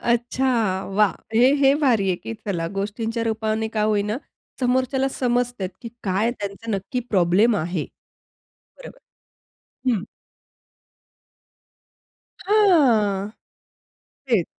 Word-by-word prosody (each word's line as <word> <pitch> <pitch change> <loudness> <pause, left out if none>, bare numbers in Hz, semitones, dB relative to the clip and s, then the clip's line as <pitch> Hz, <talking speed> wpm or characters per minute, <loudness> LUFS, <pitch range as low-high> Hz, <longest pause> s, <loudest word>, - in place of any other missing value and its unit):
अच्छा. 240 +2 0 0.5
वाह! 210 -1 +4 0.2
हे 250 +4 +5
हे 275 -1 +4
भारी 230 -9 +3
आहे, 185 - +1
की 225 - -7
चला 175 -5 -1
गोष्टींच्या 225 +4 -3
रूपाने 220 0 -1
का 220 -1 -1
होई 210 -1 +2
ना 210 +2 -2 0.4
समोरच्याला 260 +1 +1
समजते 245 -6 -1
की 235 - -5
काय 200 +4 +1
त्यांचा 205 0 -6
नक्की 210 +5 -2
प्रॉब्लेम 200 +4 +3
आहे. 170 -2 -2 0.9
बरोबर. - - -11 0.9
हं. 210 -5 0 2.4
हां, 250 - +3 1.0
तेच. 225 -10 +2
225 Hz, 105 wpm, -23 LUFS, 200-245 Hz, 2.4 s, हे